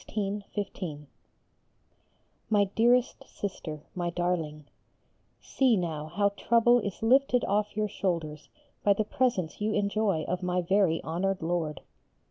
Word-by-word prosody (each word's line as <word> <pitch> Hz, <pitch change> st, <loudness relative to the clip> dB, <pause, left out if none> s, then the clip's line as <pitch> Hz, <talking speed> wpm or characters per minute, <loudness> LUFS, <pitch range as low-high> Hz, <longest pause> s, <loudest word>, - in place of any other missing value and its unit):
_ 200 Hz, -6 st, -4 dB, 1.4 s
MY 205 Hz, -2 st, +4 dB
DEAREST 245 Hz, +3 st, +3 dB
SISTER, 155 Hz, -6 st, -6 dB
MY 175 Hz, -1 st, -2 dB
DARLING, 170 Hz, -4 st, -2 dB, 0.7 s
See 255 Hz, -5 st, +2 dB
now 160 Hz, -4 st, -3 dB
how 200 Hz, +5 st, +1 dB
trouble 235 Hz, +4 st, +3 dB
is 200 Hz, -1 st, -5 dB
lifted 250 Hz, +1 st, +4 dB
off 210 Hz, +1 st, 0 dB
your 215 Hz, 0 st, +1 dB
shoulders 170 Hz, -6 st, -3 dB, 0.3 s
by 205 Hz, -, +5 dB
the 215 Hz, -, 0 dB
presence 210 Hz, -8 st, -1 dB
you 215 Hz, +1 st, 0 dB
enjoy 200 Hz, -5 st, +1 dB
of 180 Hz, +2 st, -3 dB
my 180 Hz, 0 st, 0 dB
very 185 Hz, -2 st, +2 dB
honoured 185 Hz, +3 st, -1 dB
Lord! 165 Hz, -2 st, -2 dB
195 Hz, 120 wpm, -28 LUFS, 170-215 Hz, 1.4 s, by